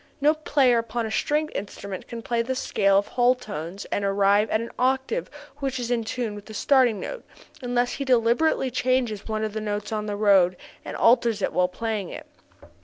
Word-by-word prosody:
No 300 +2 +4
player 280 -6 +2
upon 230 0 -3
a 220 - -4
stringed 300 +6 0
instrument 200 -1 -6
can 235 -1 -7
play 235 0 0
the 260 +3 -2
scale 195 -5 +2
of 200 - 0
whole 245 0 +3
tones 200 -5 -7
and 200 - -1
arrive 200 +2 +3
at 215 - +1
an 230 +1 -5
octave 265 - 0 0.3
which 270 -3 -3
is 240 0 -3
in 235 -2 +1
tune 225 -1 -3
with 205 0 -10
the 220 - -9
starting 250 -4 +3
note, - - -6 0.4
unless 245 -1 0
he 280 - -3
deliberately 255 +2 +2
changes 250 -4 0
one 215 -1 -2
of 215 -1 -3
the 220 - -3
notes 210 0 -3
on 215 -1 -2
the 205 - -2
road 195 -4 +4 0.3
and - - -6
alters 230 -3 +3
it - - 0
while 180 0 +3
playing 210 0 -3
it. - - -8
230 Hz, 200 wpm, -25 LUFS, 205-255 Hz, 0.4 s, No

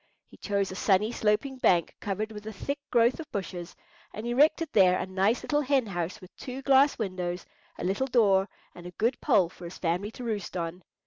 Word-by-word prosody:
He - - -16
chose 200 -2 -1
a - - -6
sunny 200 +3 +2
sloping 235 +5 0
bank 175 -8 +2
covered 215 +2 -3
with 210 0 -9
a - - -4
thick 280 +8 -4
growth 240 +3 +3
of 320 - -8
bushes, 180 -3 -5 0.4
and 215 - -6
erected 290 +6 +3
there 185 -3 +5
a - - -2
nice 190 +5 +1
little 295 0 +1
hen 270 -3 +2
house 180 0 -4
with 185 -2 -15
two 260 +1 -7
glass 275 +1 +5
windows, 180 -4 -3 0.3
a - - -6
little 195 +9 0
door, 205 -6 +3 0.2
and 175 0 -10
a - - -8
good 235 +4 0
pole 200 - +4
for 175 0 -12
his 170 - -8
family 180 +4 -1
to 245 - -9
roost 210 -6 -3
on. 170 +1 -4
210 Hz, 205 wpm, -28 LUFS, 185-245 Hz, 0.4 s, there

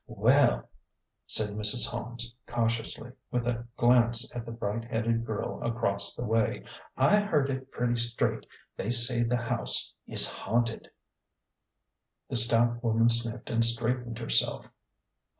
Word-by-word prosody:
" - - -52
Well," - - +2 0.6
said 105 -1 +2
Mrs. 105 +3 +4
Holmes, 120 0 -5
cautiously, 115 +1 -3 0.2
with 125 -1 -2
a 120 0 -3
glance 120 -1 +2
at 120 -1 -6
the - - -6
bright 115 0 -4
headed 115 0 -1
girl 110 -2 -4
across 100 -4 0
the 120 - -5
way 115 -1 -1 0.2
" - - -22
I 210 +1 +4
heard 150 -10 0
it 130 0 -6
pretty 120 -1 -2
straight 120 0 -1 0.3
they 100 - -4
say 120 0 +2
the 120 +1 0
house 115 -1 +2
is - - +7
haunted." 115 -1 -2 1.4
The - - -2
stout 120 +1 +3
woman 115 0 +2
sniffed 115 0 -1
and 115 0 +1
straightened 115 +1 -2
herself. 115 -1 0
120 Hz, 140 wpm, -28 LUFS, 115-120 Hz, 1.4 s, is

